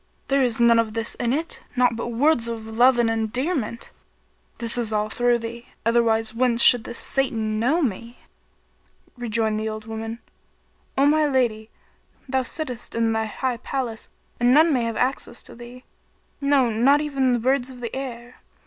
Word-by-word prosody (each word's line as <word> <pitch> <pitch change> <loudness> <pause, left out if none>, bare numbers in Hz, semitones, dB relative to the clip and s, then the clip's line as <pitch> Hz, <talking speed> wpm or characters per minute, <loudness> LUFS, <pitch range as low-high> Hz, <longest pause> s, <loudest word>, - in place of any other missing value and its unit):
There 275 0 +3
is 240 -3 +1
none 235 -1 +5
of 220 -1 -1
this 225 0 -2
in 235 - 0
it, 320 +5 -3
naught 245 -1 +3
but 230 - -4
words 240 +1 +2
of 230 -1 -5
love 240 +3 +4
and 240 -1 +3
endearment. 235 +3 -2 0.7
This 230 -1 -1
is 235 -3 -1
all 210 0 0
through 240 +1 +2
thee: 235 +1 -8 0.2
otherwise 225 -1 +2
whence 235 0 +2
should 245 -3 +6
this 235 - -6
Satan[FN#33] 270 -1 -1
know 225 +8 0
me?" 235 0 -3 1.0
Rejoined 225 -3 -1
the 220 0 -2
old 215 0 -6
woman, 225 0 -5 0.8
"o 275 - +4
my 305 +1 +4
lady, 235 -5 0 0.6
thou 265 0 +1
sittest 255 -2 -4
in 230 -1 +1
thy 220 0 0
high 245 +3 -2
palace 240 -3 -4 0.3
and 240 +1 +4
none 315 +1 +5
may 245 -3 +1
have 230 -1 -3
access 250 -1 -2
to - - -9
thee; 240 +2 -12 0.6
no, 280 -4 +3
not 260 +7 +4
even 275 -4 +1
the - - +2
birds 255 +2 +1
of 255 -1 -10
the 235 0 -5
air. 245 -2 -7
240 Hz, 175 wpm, -23 LUFS, 225-260 Hz, 1.0 s, should